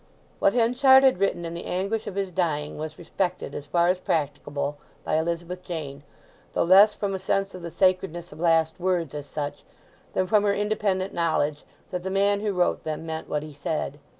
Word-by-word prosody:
What 195 Hz, -, +4 dB
Henchard 255 Hz, +3 st, +6 dB
had 260 Hz, -9 st, +4 dB
written 195 Hz, -3 st, 0 dB
in 165 Hz, -, -5 dB
the 170 Hz, -, -6 dB
anguish 200 Hz, +5 st, -2 dB
of 195 Hz, -, -5 dB
his 195 Hz, -2 st, -2 dB
dying 155 Hz, -4 st, -1 dB
was 155 Hz, 0 st, -5 dB
respected 175 Hz, -3 st, -3 dB
as 145 Hz, -, -6 dB
far 170 Hz, +3 st, +2 dB
as 180 Hz, 0 st, +1 dB
practicable 145 Hz, -3 st, -2 dB, 0.2 s
by -, -, 0 dB
Elizabeth 170 Hz, +2 st, -3 dB
Jane, 145 Hz, -5 st, -6 dB, 0.5 s
though -, -, +2 dB
less 195 Hz, +4 st, +7 dB
from 200 Hz, -1 st, -2 dB
a 190 Hz, -, -2 dB
sense 195 Hz, +1 st, 0 dB
of 185 Hz, -, -8 dB
the 170 Hz, -, -5 dB
sacredness 175 Hz, -1 st, 0 dB
of -, -, -12 dB
last 165 Hz, -1 st, +2 dB
words, 175 Hz, -5 st, 0 dB
as 145 Hz, -1 st, -6 dB
such, 145 Hz, -1 st, -5 dB, 0.5 s
than 185 Hz, -, +1 dB
from 210 Hz, +3 st, +3 dB
her 200 Hz, -1 st, +2 dB
independent 205 Hz, -2 st, 0 dB
knowledge 155 Hz, -3 st, 0 dB, 0.3 s
that 180 Hz, -1 st, -2 dB
the 190 Hz, -, -4 dB
man 200 Hz, +1 st, +2 dB
who 210 Hz, 0 st, -1 dB
wrote 180 Hz, -2 st, +1 dB
them 155 Hz, +1 st, -4 dB
meant 160 Hz, 0 st, -5 dB
what 150 Hz, 0 st, -1 dB
he 155 Hz, -1 st, -9 dB
said. 145 Hz, 0 st, -3 dB
175 Hz, 200 wpm, -25 LUFS, 155-195 Hz, 0.5 s, less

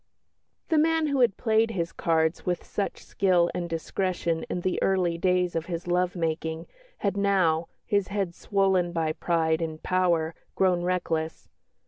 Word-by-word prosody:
The 320 Hz, -, +4 dB
man 325 Hz, 0 st, +3 dB
who 280 Hz, -2 st, 0 dB
had 240 Hz, -6 st, +3 dB
played 225 Hz, -1 st, +2 dB
his 170 Hz, -6 st, -2 dB
cards 160 Hz, 0 st, 0 dB
with 175 Hz, -1 st, -1 dB
such 200 Hz, -, -4 dB
skill 180 Hz, -3 st, +2 dB
and 175 Hz, -1 st, -3 dB
discretion 165 Hz, 0 st, -2 dB
in 180 Hz, -, -2 dB
the 185 Hz, +1 st, -1 dB
early 180 Hz, -3 st, +2 dB
days 180 Hz, -1 st, +1 dB
of 165 Hz, 0 st, -2 dB
his 170 Hz, -1 st, -4 dB
love 180 Hz, +1 st, +1 dB
making 160 Hz, -1 st, -2 dB, 0.3 s
had 200 Hz, -1 st, -1 dB
now, 185 Hz, -5 st, +2 dB, 0.2 s
his 200 Hz, -2 st, +1 dB
head 195 Hz, -4 st, -2 dB
swollen 190 Hz, -3 st, +1 dB
by 160 Hz, -2 st, 0 dB
pride 160 Hz, -1 st, +1 dB
and 160 Hz, -1 st, -4 dB
power, 170 Hz, -3 st, +1 dB, 0.2 s
grown 185 Hz, -2 st, +2 dB
reckless. 165 Hz, -3 st, -2 dB
180 Hz, 155 wpm, -27 LUFS, 165-195 Hz, 0.3 s, The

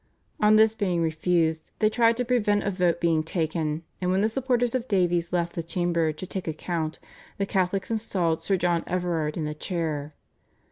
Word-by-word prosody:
On 210 Hz, 0 st, +5 dB
this 220 Hz, 0 st, +5 dB
being 185 Hz, -6 st, 0 dB
refused, 160 Hz, 0 st, 0 dB
they 215 Hz, -, +3 dB
tried 230 Hz, +1 st, +3 dB
to 250 Hz, -, 0 dB
prevent 210 Hz, -4 st, +2 dB
a 200 Hz, -, 0 dB
vote 180 Hz, -3 st, +1 dB
being 165 Hz, -2 st, +2 dB
taken, 160 Hz, -1 st, -2 dB, 0.2 s
and 180 Hz, -, 0 dB
when 190 Hz, +1 st, +2 dB
the 215 Hz, -, +2 dB
supporters 245 Hz, -1 st, 0 dB
of 255 Hz, -1 st, -1 dB
Davies 175 Hz, -4 st, +1 dB
left 170 Hz, -1 st, 0 dB
the 170 Hz, -, -3 dB
chamber 170 Hz, -1 st, 0 dB
to 155 Hz, +5 st, -7 dB
take 185 Hz, 0 st, -5 dB
a 160 Hz, -, -1 dB
count, 160 Hz, -1 st, -3 dB, 0.4 s
the 200 Hz, -, 0 dB
Catholics 190 Hz, +1 st, -1 dB
installed 180 Hz, -7 st, 0 dB
Sir 190 Hz, +4 st, +1 dB
John 175 Hz, -1 st, +1 dB
Everard 170 Hz, -4 st, -1 dB
in 160 Hz, -, -2 dB
the 150 Hz, -, -3 dB
chair. 155 Hz, -3 st, -3 dB
175 Hz, 190 wpm, -26 LUFS, 165-205 Hz, 0.4 s, On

